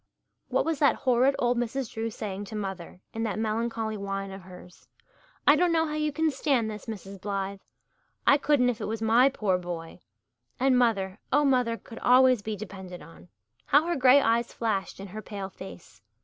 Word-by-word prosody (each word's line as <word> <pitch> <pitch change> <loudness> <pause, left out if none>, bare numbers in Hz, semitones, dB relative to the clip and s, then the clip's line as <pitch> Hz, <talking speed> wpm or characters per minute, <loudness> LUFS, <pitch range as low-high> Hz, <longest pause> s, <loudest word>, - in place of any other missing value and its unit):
What - - 0
was 325 -3 -1
that 285 - +4
horrid 260 +1 +2
old 245 0 +1
Mrs. 245 +1 -3
Drew 225 +1 -2
saying 205 -2 -5
to 215 - -8
mother, 190 -3 -6
in 225 - -4
that 220 -3 -2
melancholy 220 0 -2
whine 195 0 -4
of 195 0 -8
hers? 180 0 -14 0.6
"I - - +8
don't 360 -1 +2
know 325 -1 +2
how 305 - -4
you 305 0 0
can 315 +2 +1
stand 260 -5 0
this, 210 +1 -9
Mrs. 200 -3 -8
Blythe. 195 -1 -3 0.7
I 285 - +5
couldn't 275 -4 +3
if 230 -1 -8
it - - -3
was 225 +1 -3
my 235 +4 +5
pore 200 -8 0
boy." 170 -2 -7 0.6
And 265 0 +3
mother 215 -6 +1
oh, 295 +1 +4
mother 250 -4 +2
could 230 - -12
always 255 -2 +5
be 215 +1 -4
depended 190 -3 -9
on! 85 +1 -15 0.4
How 290 +3 +4
her 345 0 0
grey 265 +1 +6
eyes 235 -2 +1
flashed 205 -5 -2
in 195 - -7
her 215 +4 -7
pale 200 -2 -6
face. 180 - -12
225 Hz, 190 wpm, -27 LUFS, 195-255 Hz, 0.7 s, I